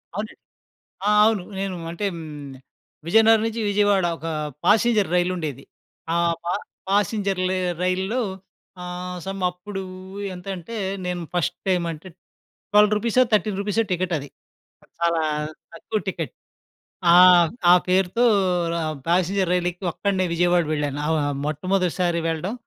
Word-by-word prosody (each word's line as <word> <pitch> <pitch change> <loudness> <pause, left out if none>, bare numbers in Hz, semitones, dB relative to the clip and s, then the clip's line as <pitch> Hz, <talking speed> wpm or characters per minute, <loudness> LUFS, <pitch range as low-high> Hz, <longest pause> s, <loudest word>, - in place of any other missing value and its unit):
అవునండి. 215 +1 -4 0.7
ఆ! - - +3 0.2
అవును. 215 -4 +2 0.2
నేను 195 -2 -3
అంటే 185 +4 -3
హ్మ్. 150 -4 -8 0.5
విజయనగరం 225 +3 +5
నుంచి 225 0 -3
విజయవాడ 200 -2 +3
ఒక 165 - -8 0.4
ప్యాసింజర్ 210 -2 +3
రైలు 180 +1 +2
ఉండేది. 145 -6 -5 0.5
ఆ - - +1 0.7
ప్యాసింజర్ 200 -1 +1
లే 185 - 0 0.2
రైలులో 190 +7 0 0.6
ఆహ్, 180 0 -5
సమ్ 195 0 -5
అప్పుడు 190 +3 -7 0.5
ఎంతంటే? 185 +3 -7 0.3
నేను 180 -1 -3
ఫస్ట్ 175 - 0
టైమ్ 180 -2 +2
అంటే 165 +3 -8 0.6
12 210 0 +5
రూపీసో, 235 +4 +2
13 210 -2 +1
రూపీసో 210 +2 0
టికెట్ 180 0 -1
అది. 145 0 -7 0.6
ఆ! - - -22
చాలా 170 -1 +2 0.5
తక్కువ 215 0 -3
టికెట్. 190 - -3 0.8
ఆహ్, 175 -1 +8 0.2
ఆ - - +10
పేరుతో 185 +5 +2 0.5
ర - - -2 0.3
ప్యాసింజర్ 185 +1 +1
రైలు 180 -1 +1
ఎక్కి 180 +2 -10
ఒక్కడినే 190 0 0
విజయవాడ 175 0 +3
వెళ్ళాను. 145 -1 -2
ఆహ్, 160 - +1
వ - - +1 0.3
మొట్టమొదటిసారి 175 +2 0
వెళ్ళడం. 165 +6 -2
185 Hz, 130 wpm, -23 LUFS, 175-205 Hz, 0.8 s, ఆ